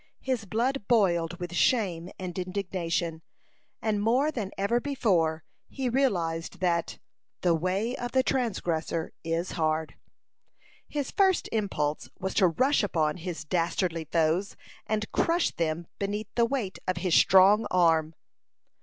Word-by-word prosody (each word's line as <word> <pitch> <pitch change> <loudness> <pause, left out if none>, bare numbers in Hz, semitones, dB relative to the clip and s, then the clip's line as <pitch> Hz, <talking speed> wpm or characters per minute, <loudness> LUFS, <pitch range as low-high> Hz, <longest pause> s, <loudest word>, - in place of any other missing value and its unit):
His 255 -5 -1
blood 230 +3 -1
boiled 175 -7 +2
with 175 0 -6
shame 180 -7 +1
and 180 -2 -6
indignation, 180 -3 -2 0.6
and 210 -2 0
more 255 +8 +2
than 225 -9 -4
ever 200 +5 +1
before 180 - +1 0.3
he 260 -2 -2
realized 175 -13 0
that 170 -2 0 0.4
"the 175 -2 +3
way 190 +9 -1
of 245 0 -5
the 260 0 +3
transgressor 175 - -1
is 165 +2 -2
hard." 160 -1 -1 0.9
His 290 -3 -3
first 380 -2 +2
impulse 155 -9 -1
was 190 - -3
to 190 - +4
rush 260 - +2
upon 160 -7 0
his 175 -1 -5
dastardly 170 0 -1
foes, 165 +5 0 0.3
and 215 0 -2
crush 335 +1 +1
them 165 0 -2
beneath 205 +1 -3
the 235 - +3
weight 235 -7 -3
of 185 -1 0
his 175 -1 -1
strong 195 +5 +6
arm. 165 -3 +3
185 Hz, 135 wpm, -28 LUFS, 165-225 Hz, 0.9 s, strong